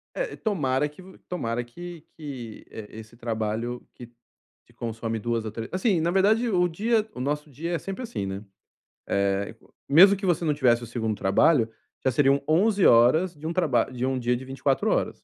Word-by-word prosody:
É, - - -3
tomara 150 - 0
que 150 +5 -15
v 185 0 -14
tomara 120 -9 -2
que, 175 +7 -9 0.2
que 130 -8 -8
e 110 -2 -9
esse 110 +1 -11
trabalho 115 +1 -3
que 120 - -11 0.6
te - - -24
consome 115 -1 -4
2 115 0 -2
ou 110 - -4
trê 115 +1 -6
assim, 185 0 +1
na 165 - +1
verdade, 215 +6 +3
o 180 -4 +3
dia 215 +5 0
o - - -9
nosso 150 +3 -2
dia 160 +6 -5
é 170 - 0
sempre 195 +6 -6
assim, 235 - -4
né. 95 +1 -5 0.6
Eh, 100 0 0 0.3
mesmo 185 +8 +8
que 195 - -5
você 175 -2 +1
não 150 - +2
tivesse 125 -5 +2
o - - -7
2º 110 -2 -2
trabalho, 115 +5 +3 0.3
já 130 - +2
seriam 140 +2 +3
11 195 +5 +3
horas 155 +10 +5
de 150 +2 -7
um 165 - -2
traba 155 -9 +2
de 125 0 -2
um 130 -1 0
dia 125 0 +1
de 125 - -6
24 135 +1 0
horas. - - -1
135 Hz, 195 wpm, -26 LUFS, 115-175 Hz, 0.6 s, mesmo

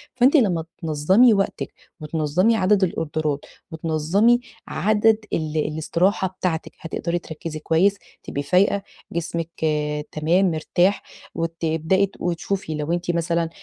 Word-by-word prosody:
فأنتِ 255 +4 +4
لمّا 180 - +2 0.2
تنظّمي 180 +10 +4
وقتِك 195 -1 -1 0.3
وتنظّمي 160 +8 +1
عدَد 200 -1 +3
الأوردرات 155 -4 -1 0.3
وتنظّمي 165 +9 +2 0.3
عدد 215 +1 +3 0.2
ال 155 -1 -1
الاستراحة 165 +6 +1
بتاعتِك 165 -3 -2
هتقدَري 170 +1 -3
تركّزي 160 -1 -7
كويس، 170 +6 +2 0.3
تبقي 140 - -4
فايقة، 195 +5 +2 0.3
جسمِك 165 0 -3 0.6
تمام 170 +5 +2
مرتاح، 175 +5 +1 0.3
وتبدئي 165 +3 0
ت 195 - -14
وتشوفي 175 -1 -2
لو 150 +1 -3
أنتِ 175 0 0
مثلًا 170 -1 0
170 Hz, 115 wpm, -22 LUFS, 160-195 Hz, 0.6 s, فأنتِ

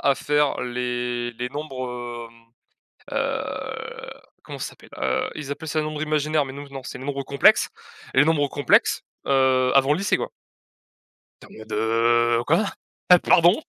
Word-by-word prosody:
à 140 - +3
faire 145 0 +1
les 120 -1 -2
les 120 +2 -4
nombres, 125 -5 -6
hem, 115 0 -26 0.5
heu, - - -4 0.3
comment - - -8
ça - - -3
s'appelle, - - -18
heu, 65 -1 0
ils 145 -2 -6
appellent 160 +3 -5
ça 155 +1 0
nombres 155 0 -4
imaginaires, 155 -1 +1
mais 130 - -8
nous 145 +1 -8
non, 135 -1 -7
c'est 125 - -7
nombres 140 +1 -3
complexes 140 +1 +4 0.5
et - - +3
les 145 - +7
nombres 150 -3 +2
complexes, 145 - +3 0.2
heu, 130 -2 +3
avant 135 +1 +5
le 150 - +1
lycée 200 - +2
quoi. - - -4 1.1
Attends - - -15
mais 110 - -10
de 115 +2 +2
quoi? 165 - +3 0.5
Heu, 180 - +10
pardon? 175 - +5
135 Hz, 160 wpm, -24 LUFS, 120-150 Hz, 1.1 s, Heu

